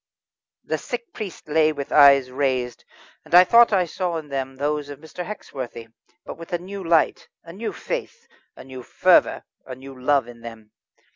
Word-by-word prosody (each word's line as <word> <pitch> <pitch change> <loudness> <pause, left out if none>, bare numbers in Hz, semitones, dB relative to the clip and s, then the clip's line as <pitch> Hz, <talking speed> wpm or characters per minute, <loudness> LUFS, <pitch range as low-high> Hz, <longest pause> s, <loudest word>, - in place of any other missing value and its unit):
The - - -3
sick 240 -1 -7
priest 200 -9 -8
lay 155 +1 +3
with 140 -2 -6
eyes 140 -3 +6
raised, 130 -3 -2 0.4
and - - -1
I 180 - +10
thought 235 +5 +5
I 190 -3 +2
saw 175 0 -3
in 155 -2 -8
them 135 -1 -4
those 145 +1 -2
of 145 - -8
Mr. 160 +4 -8
Hexworthy, 130 - -8 0.4
but - - -9
with 165 - -11
a - - +2
new 190 +3 -8
light, 165 -2 +1 0.2
a 165 - -11
new 220 +5 -4
faith, 475 -1 -6 0.3
a - - -12
new 130 -1 -10
fervour, - - +3 0.2
a 130 - -8
new 135 +1 -12
love 140 -1 +2
in 120 -1 -13
them. 115 -2 -11
145 Hz, 185 wpm, -23 LUFS, 130-180 Hz, 0.4 s, I